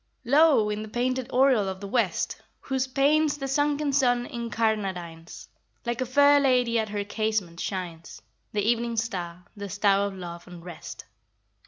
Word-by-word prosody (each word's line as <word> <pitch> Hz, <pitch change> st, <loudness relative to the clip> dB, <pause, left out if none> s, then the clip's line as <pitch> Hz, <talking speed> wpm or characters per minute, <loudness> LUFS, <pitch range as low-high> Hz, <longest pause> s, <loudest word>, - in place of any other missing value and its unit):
Lo! 275 Hz, -5 st, +4 dB
in 210 Hz, 0 st, -3 dB
the 215 Hz, -, -6 dB
painted 255 Hz, +2 st, -1 dB
oriel 250 Hz, -6 st, +3 dB
of 190 Hz, 0 st, -6 dB
the 200 Hz, -, -7 dB
West, 200 Hz, -5 st, -1 dB, 0.2 s
Whose 265 Hz, -1 st, -1 dB
panes 290 Hz, +3 st, +2 dB
the 275 Hz, -1 st, -4 dB
sunken 290 Hz, +1 st, 0 dB
sun 245 Hz, -3 st, +2 dB
incarnadines, 200 Hz, -9 st, -3 dB, 0.4 s
Like 235 Hz, +1 st, -2 dB
a 255 Hz, -, -1 dB
fair 285 Hz, +3 st, +5 dB
lady 250 Hz, -4 st, +2 dB
at 220 Hz, -1 st, -2 dB
her 205 Hz, -1 st, -2 dB
casement, 205 Hz, -5 st, -2 dB
shines 175 Hz, -, -5 dB, 0.3 s
The 205 Hz, -1 st, -1 dB
evening 235 Hz, +1 st, 0 dB
star, 180 Hz, -6 st, -4 dB
the 200 Hz, -1 st, -7 dB
star 200 Hz, +1 st, +2 dB
of 200 Hz, -, -7 dB
love 175 Hz, -1 st, -8 dB
and 175 Hz, -1 st, -11 dB
rest! 175 Hz, -3 st, -9 dB
225 Hz, 160 wpm, -26 LUFS, 195-260 Hz, 0.4 s, fair